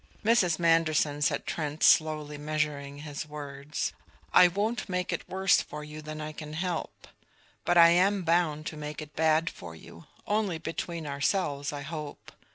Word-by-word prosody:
"Mrs. 195 -8 +4
Manderson," 155 -3 +2
said 145 - +1
Trent, 150 -1 -3
slowly 155 -2 +4
measuring 145 -2 -3
his 150 0 -5
words, 145 -1 -5 0.4
"I 180 - +8
won't 210 +5 -2
make 180 0 -1
it - - -5
worse 190 0 +3
for 150 0 -8
you 150 +1 -9
than 155 0 -7
I 155 0 -5
can 150 0 -8
help. 175 +1 -4 0.6
But 175 - +3
I 170 0 +9
am 190 +3 +3
bound 165 -3 +1
to 155 - -5
make 150 0 -6
it 150 - -15
bad 160 +1 +3
for 80 - -7
you 80 +1 -14 0.2
only 205 -5 0
between 165 0 -5
ourselves, 140 0 -1
I 145 -1 -5
hope. 150 -1 -7
155 Hz, 165 wpm, -28 LUFS, 150-175 Hz, 0.6 s, I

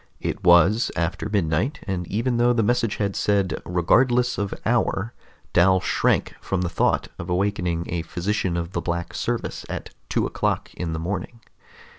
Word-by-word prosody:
It - - -4
was 90 +6 +5
after 85 +4 -2
midnight, 100 - 0
and 90 -3 -3
even 120 +3 0
though 120 +1 +4
the 115 -2 +2
message 115 -1 +1
had 100 -2 -1
said 100 -3 +1
"regardless 120 +8 +3
of 100 -1 -2
hour," 115 -2 +1 0.4
Dal 95 +2 +5
shrank - - +1
from 95 -2 -1
the 90 - -1
thought - - +1
of 85 - -6
awakening 90 -2 0
a 85 -1 -2
physician 90 +1 -1
of 85 +1 -3
the - - -2
Black 85 0 -3
Service - - -3
at - - -5 0.2
two - - +1
o'clock - - -1
in 85 -2 -4
the 80 - -3
morning. 95 +6 -4
95 Hz, 165 wpm, -24 LUFS, 85-110 Hz, 0.4 s, was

